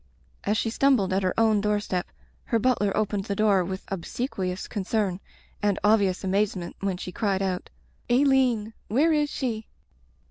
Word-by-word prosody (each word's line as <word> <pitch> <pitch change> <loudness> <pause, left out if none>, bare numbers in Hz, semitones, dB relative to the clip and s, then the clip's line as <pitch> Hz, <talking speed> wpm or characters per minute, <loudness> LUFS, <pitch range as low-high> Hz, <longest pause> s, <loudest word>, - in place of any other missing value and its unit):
As 210 +2 +1
she 225 - 0
stumbled 235 -7 +3
at 190 - +2
her 185 +3 0
own 220 -2 +4
doorstep 205 -3 -1 0.4
her 230 - +1
butler 225 -3 +2
opened 205 -2 0
the 200 - -2
door 200 -3 +3
with 190 +2 -5
obsequious 190 0 -3
con 205 -4 -3
cern, 195 -2 0 0.4
and 205 -2 +1
obvious 205 -3 +3
amazement 190 -2 -1
when 195 -2 -1
she 180 - -6
cried 195 -2 0
out 185 -1 -2 0.2
— - - -37
^"4^1een 250 -4 +3
— - - -37
^where 310 +8 +3
is 295 -1 +1
she?" 225 -6 -3
205 Hz, 170 wpm, -26 LUFS, 190-225 Hz, 0.4 s, own